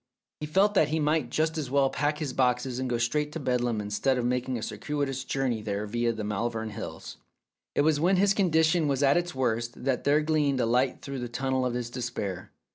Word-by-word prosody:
He 150 - -4
felt 195 +6 +3
that 160 -7 +4
he 155 +2 -1
might 150 -4 +1
just 160 +3 0
as 140 -5 -4
well 135 0 +2
pack 150 +1 0
his 150 -5 -3
boxes 125 0 +1
and 130 -1 -2
go 120 - 0
straight 145 +6 0
to 165 - -4
Bedlam 125 -4 0
instead 105 +6 0
of 120 - -1
making 125 0 -1
a 110 - -5
circuitous 135 +4 -3
journey 130 -4 -1
there 105 0 -3
via 120 +2 0
the 110 -2 -5
Malvern 110 +2 -2
Hills. 105 -7 -7 0.6
It - - +3
was 150 0 +3
when 180 +5 +3
his 200 +2 +4
condition 160 -4 +3
was 140 0 +1
at 140 0 +5
its 175 -3 -1
worst 120 -2 -1
that 130 -2 0
there 145 +2 +3
gleamed 150 -3 +1
a 120 - +2
light 125 +3 +1
through 140 -1 -5
the 120 -1 -4
tunnel 130 +1 0
of 120 - -3
his 120 -1 -3
despair. 105 -7 -4
130 Hz, 220 wpm, -28 LUFS, 120-150 Hz, 0.6 s, at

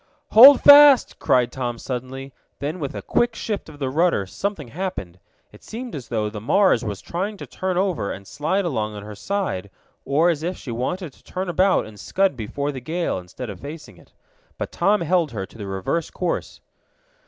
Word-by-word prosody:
"Hold 260 +5 +10
fast!" 285 -2 +8
cried 125 -2 +2
Tom 120 -2 -4
suddenly. 130 +2 -6 0.2
Then 150 +6 -4
with 140 -4 -4
a - - -6
quick 240 -1 +1
shift 210 -6 -4
of 150 - -12
the 135 -2 -3
rudder 165 - +2
something 160 - -4
happened. 115 - -5 0.3
It - - -17
seemed 240 +1 -7
as 135 -5 -7
though 110 -3 -1
the 105 0 -7
Mars 185 - +3
was 105 -3 -5
trying 195 +5 -4
to - - -8
turn 185 -1 -3
over, 185 - 0
and 100 0 -8
slide 155 - -1
along 110 -9 -2
on 100 - -8
her 105 0 -8
side, 105 - -3 0.3
or 160 +5 +3
as 155 -3 -4
if 175 +3 -3
she 125 - -8
wanted 145 - -3
to - - -24
turn 185 0 -5
about 185 +3 +2
and 105 -2 -13
scud 190 - 0
before 140 +6 -3
the 130 -3 -7
gale, 165 - -2
instead 95 +6 -8
of 95 - -10
facing 150 +6 -9
it. - - -20 0.5
But - - -4
Tom 205 0 +2
held 170 -4 +1
her 95 -3 -4
to 115 - -17
the 100 - -6
reverse 95 - -2
course. 180 -2 -4
145 Hz, 200 wpm, -22 LUFS, 115-185 Hz, 0.5 s, Hold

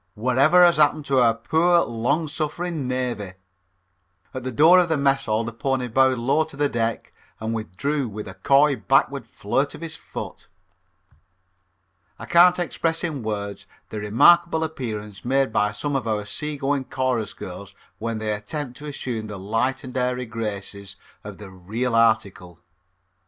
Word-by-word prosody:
"What 125 +4 -1
ever 175 +6 +7
has 170 -2 +4
happened 150 0 +3
to 135 -2 +2
our 115 -2 +4
poor, 170 +7 +3
long 135 +7 -1
suffering 155 0 -3
navy?" 120 -7 -3 1.0
At 130 - -5
the 130 - -3
door 160 +9 +6
of 175 -2 +2
the 160 - +1
Mess 140 -2 +1
Hall 110 +1 +1
the 115 0 -5
pony 130 +1 -1
bowed 130 +2 +3
low 135 +6 +2
to 155 -3 -12
the 145 0 +2
deck 115 -3 -2 0.3
and 110 +1 -3
withdrew 125 - -2
with 105 0 -7
a 95 - -8
coy 140 +9 +3
backward 135 +1 +1
flirt 135 +7 -2
of - - -12
his 165 -1 -6
foot. - - -8 1.7
I - - -8
can't 175 +1 +6
express 165 -1 -1
in 155 -6 -3
words 100 -2 -5 0.2
the 110 - -5
remarkable 160 +11 +4
appearance 110 -10 -5
made 135 -2 +1
by 105 -1 +2
some 140 +7 -3
of 130 -4 -2
our 105 -2 -1
seagoing 140 +2 -2
chorus 130 -5 -2
girls 95 +2 -9 0.2
when 115 0 -3
they 110 -1 -2
attempt 125 +6 -5
to 150 - -8
assume 120 -6 -4
the 105 -1 -7
light 115 +7 -1
and 130 -1 -9
airy 125 0 -1
graces 100 -3 -6 0.3
of - - -9
the 100 -3 -11
real 110 +7 -3
article. 110 -6 +1
125 Hz, 165 wpm, -23 LUFS, 110-145 Hz, 1.7 s, ever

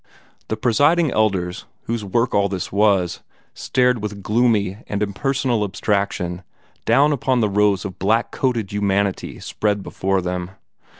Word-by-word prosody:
The 110 - -2
Presiding 145 +8 +3
Elders, 95 -6 0 0.2
whose 115 -1 -3
work 115 +5 0
all 100 0 +2
this 95 -2 -4
was, 100 -4 +2 0.3
stared 125 -2 +1
with 105 -2 -5
gloomy 105 -3 +1
and 105 0 -1
impersonal 120 +2 0
abstraction 100 -3 -1 0.4
down 145 +2 +4
upon 130 -2 +1
the 105 - +2
rows 100 -1 +2
of 95 -2 -7
blackcoated 115 +2 0
humanity 100 -1 -1
spread 105 -2 -1
before 95 +1 -1
them. 90 0 -3
105 Hz, 130 wpm, -21 LUFS, 95-120 Hz, 0.4 s, down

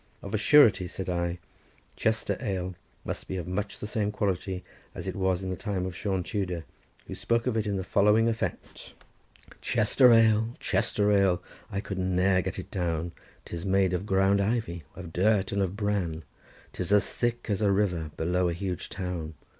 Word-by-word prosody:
"Of, 100 - -7
a - - +3
surety," 110 -6 +6
said 95 +1 -4
I, 85 0 -1 0.6
"Chester 110 0 0
ale 95 -5 -2 0.3
must - - -4
be 95 - -3
of 90 - -5
much 100 +3 -3
the - - -6
same 105 -1 -1
quality 95 -2 -2 0.3
as - - -6
it - - -3
was 95 -1 0
in 95 - -3
the - - -2
time 95 -1 -3
of 95 -2 -5
Sion 95 -2 -1
Tudor, 90 -4 -3 0.4
who - - -7
spoke 115 0 0
of 125 -3 0
it 110 -1 0
to 105 - -1
the 95 -1 -2
following 105 +4 +4
effect:— 115 -1 -4 0.7
"'Chester 120 +4 +4
ale, 110 0 +4
Chester 105 0 +1
ale! 95 -3 +3 0.3
I 100 - -2
could 100 -2 -5
ne'er 95 0 +2
get - - -4
it - - -7
down, 85 -2 -1 0.3
'Tis 85 -1 -6
made 95 -1 +2
of 90 +3 -2
ground 95 +1 +3
ivy, 100 -5 -1
of 90 -3 -9
dirt, 100 +1 +2
and 100 - 0
of 95 +1 -1
bran, 95 -6 -1 0.5
'Tis 90 +1 -3
as 105 -1 +3
thick 120 0 -1
as 105 -2 -1
a 100 -2 +3
river 90 -6 0
below 90 +2 +1
a - - -1
huge 90 0 -4
town! 90 -4 -4
95 Hz, 185 wpm, -28 LUFS, 90-105 Hz, 0.7 s, surety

